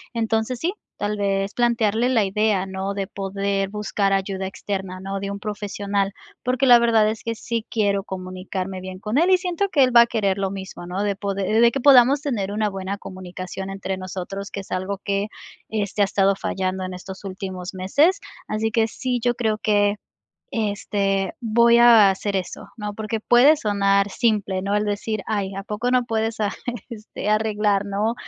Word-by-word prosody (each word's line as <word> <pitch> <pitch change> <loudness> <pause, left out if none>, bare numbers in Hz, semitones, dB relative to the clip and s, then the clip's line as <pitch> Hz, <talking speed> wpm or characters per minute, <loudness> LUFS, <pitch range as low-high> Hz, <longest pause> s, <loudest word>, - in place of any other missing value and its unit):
Entonces, 225 +2 0
sí, 355 +4 -1 0.2
tal 210 +1 -2
vez, 195 0 0
plantearle 235 -1 +2
la 230 -5 +3
idea, 200 -1 +1
¿no?, 190 +1 -4
de 200 -1 -3
poder 195 0 -2
buscar 205 -1 -1
ayuda 195 0 -1
externa, 190 -1 -5
¿no?, 195 +1 -4
de 200 0 -4
un 200 - -5
profesional, 200 -1 -2 0.3
porque 255 +1 +1
la 240 -1 +9
verdad 225 -2 +4
es 220 - -5
que 230 0 -3
sí 230 0 -3
quiero 200 -3 +1
comunicarme 185 0 -5
bien 185 0 -8
con 210 +5 -2
él 340 +4 +4
y 370 - +7
siento 365 +2 -1
que 290 -7 +4
él 255 -1 +2
va 235 - +10
a - - +6
querer 205 -5 0
lo 195 -1 -1
mismo, 190 -2 -7
¿no?, 180 +3 -3
de 205 -1 0
poder, 195 -1 -3
eh, 220 +1 +2
de 235 0 +6
que 275 - -3
podamos 270 +1 +6
tener 220 -10 -2
una 210 0 0
buena 195 0 -4
comunicación 185 +1 -7
entre 195 -1 -4
nosotros, 190 +2 -6
que 200 - -5
es - - -16
algo 185 +2 -2
que, 200 0 -1 0.4
este, 205 -1 0
ha - - +4
estado 195 0 +2
fallando 190 -1 -2
en 185 - -5
estos 190 +2 -9
últimos 185 -1 -6
meses. 285 - +2 0.3
Así 215 +1 -1
que, 225 -2 +2
sí, 250 +1 -2
yo 245 0 +2
creo 220 -3 0
que, 205 -1 +2 0.6
este, 200 -3 -1
voy 235 +1 +4
a 230 -4 +8
hacer 195 +1 -1
eso, 180 - -6
¿no?, 210 -1 -4
porque 220 +1 -3
puede 250 +8 +5
sonar 200 -3 +2
simple, 205 -5 0
¿no?, 200 +1 -1
el 210 - 0
decir: 210 +1 -2
"Ay, 200 -3 -1
a 195 - -5
poco 215 +4 -2
no 250 -1 +3
puedes 225 -1 -1
arre 210 -2 -1 0.3
este, 215 -3 -7
arreglar, 210 -2 +1
¿no?, 205 +3 0
205 Hz, 190 wpm, -23 LUFS, 195-225 Hz, 0.6 s, va